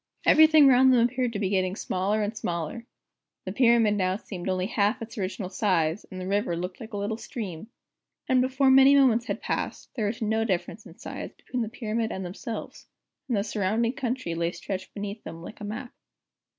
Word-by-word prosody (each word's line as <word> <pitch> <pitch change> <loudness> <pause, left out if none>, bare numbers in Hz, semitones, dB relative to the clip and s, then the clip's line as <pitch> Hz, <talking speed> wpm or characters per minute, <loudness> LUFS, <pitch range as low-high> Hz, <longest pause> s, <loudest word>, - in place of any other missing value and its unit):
Everything 315 -1 +7
round 260 0 +6
them 245 -2 +5
appeared 250 0 -1
to - - -2
be 200 -2 -1
getting 185 -1 +1
smaller 205 +2 -1
and 210 +2 -3
smaller. 175 +4 -4 0.6
The 185 - -3
Pyramid 230 -1 +4
now 185 -2 +1
seemed 190 -3 -6
only 185 0 0
half 205 0 +1
its 225 0 -8
original 190 -1 -4
size, 180 -3 0
and 185 - -7
the 185 - -5
river 200 -2 0
looked 180 +1 -5
like 225 -1 -10
a - - -2
little 205 +2 -2
stream. 210 -6 -6 0.6
And 255 -1 +4
before 265 +1 +3
many 270 +1 +7
moments 250 -4 +4
had - - -3
passed, - - -3
there 220 -5 -1
was 220 +2 -3
no 220 0 +1
difference 205 +1 -3
in 165 - -15
size - - -7
between 250 - -4
the 225 - -2
Pyramid 225 -1 -2
and 190 - -4
themselves, 200 +6 -7 0.4
and 240 -5 0
the 200 - +1
surrounding 215 +3 0
country 255 -9 -3
lay 170 +1 -1
stretched 190 -1 -6
beneath 205 +1 -5
them 165 +1 -8
like 215 - -10
a - - -4
map. 240 +5 -6
215 Hz, 200 wpm, -27 LUFS, 185-235 Hz, 0.6 s, Everything